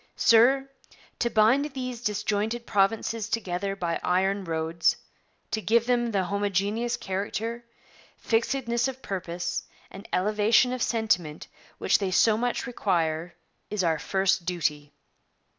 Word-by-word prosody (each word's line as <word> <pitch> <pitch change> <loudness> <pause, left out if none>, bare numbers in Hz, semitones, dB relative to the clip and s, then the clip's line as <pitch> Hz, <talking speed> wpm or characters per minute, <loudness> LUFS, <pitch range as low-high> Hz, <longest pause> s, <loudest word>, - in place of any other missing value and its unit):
Sir, 260 +4 +5 0.5
to 235 - +1
bind 235 +6 +4
these 255 -3 -4
disjointed 210 +2 -1
provinces 220 +2 0
together 195 -3 -2
by 170 -3 -2
iron 190 +2 +1
roads; 165 0 +1 0.6
to 220 - -1
give 230 +2 +2
them 240 -1 +1
the 200 -4 0
homogeneous 200 +4 -1
character, 215 +5 -4 0.5
fixedness 235 +1 0
of 265 0 -7
purpose, 180 -2 -3 0.3
and 195 +2 -11
elevation 215 +6 +3
of 255 - -4
sentiment, 180 -11 0 0.3
which - - +2
they 195 -2 -1
so 215 +4 +4
much 245 +2 -1
require, 170 -8 -1 0.3
is 210 -3 -1
our 160 -2 +1
first 190 +2 +1
duty. 150 -5 -2
205 Hz, 125 wpm, -26 LUFS, 185-235 Hz, 0.6 s, Sir